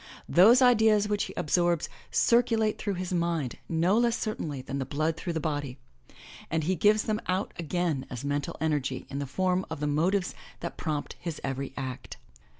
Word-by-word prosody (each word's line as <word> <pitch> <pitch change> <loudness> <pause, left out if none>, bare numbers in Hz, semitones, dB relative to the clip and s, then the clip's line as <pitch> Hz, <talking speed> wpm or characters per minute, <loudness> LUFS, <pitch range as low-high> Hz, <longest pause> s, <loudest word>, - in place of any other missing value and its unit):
Those 230 +9 +7
ideas 220 -4 +5
which 205 -1 0
he - - -8
absorbs 175 +1 +1 0.2
circulate 225 -2 +2
through 200 -3 -2
his 185 0 -4
mind 170 -6 -1
no 175 +6 +3
less 235 -1 +2
certainly 150 - -4
than 140 +1 -4
blood 155 +4 -1
through 170 +1 -4
his 160 - -2
body, 145 -4 -2 0.7
and 160 0 0
he 180 +5 +1
gives 210 +5 +4
them 215 0 -1
out 185 +2 -1
again 170 -4 -1
as 125 +2 -6
mental 145 0 -2
energy 145 -4 -1
in 140 - -3
the 140 - -3
form 185 +6 0
of 160 -2 -5
the 150 - -1
motives 175 +6 +1 0.3
that - - -5
prompt 150 -3 -3
his 170 -3 -5
every 135 0 -3
act. 130 -2 -6
170 Hz, 175 wpm, -28 LUFS, 145-200 Hz, 0.7 s, Those